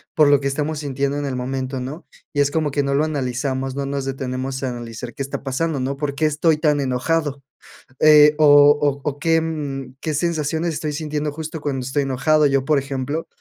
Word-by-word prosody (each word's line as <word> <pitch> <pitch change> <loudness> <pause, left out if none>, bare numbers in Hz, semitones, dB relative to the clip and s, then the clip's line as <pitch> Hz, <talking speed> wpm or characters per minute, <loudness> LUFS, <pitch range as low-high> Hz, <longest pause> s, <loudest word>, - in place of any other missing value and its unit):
por 155 -3 +5
lo 145 -1 +5
que 140 - -2
estamos 150 +2 -2
sintiendo 140 0 -2
en 145 - -2
el 135 -2 -3
momento, 130 +1 -3
¿no?, 140 +7 -7 0.3
y 145 - +1
es 140 0 +2
como 155 -1 0
que 140 0 0
no 140 0 -1
lo 145 +2 +2
analizamos, 135 -2 -2
no 140 0 -3
nos 140 -1 -3
detenemos 130 0 -4
a 130 - -1
analizar 120 0 -7
qué 140 - -3
está 135 - -5
pasando, 140 +2 -2
¿no?, 135 +2 -2
¿por 145 -1 -2
qué 155 +2 +1
estoy 155 +1 +2
tan 150 -2 +2
enojado? 140 +2 -1 0.6
Eh, 150 -1 +7
o 155 -1 +4 0.4
o 140 -1 +1
o 145 -1 -3
qué, 165 +1 +2
mm, 140 -5 -4
qué 155 - -2
sensaciones 160 +1 -1
estoy 150 0 -3
sintiendo 150 -1 -3
justo 160 0 -6
cuando 135 -3 -2
estoy 140 +2 0
enojado, 135 +3 +2
yo, 135 -1 +1
por 150 -2 +3
ejemplo, 140 +3 -3
140 Hz, 210 wpm, -21 LUFS, 135-155 Hz, 0.6 s, Eh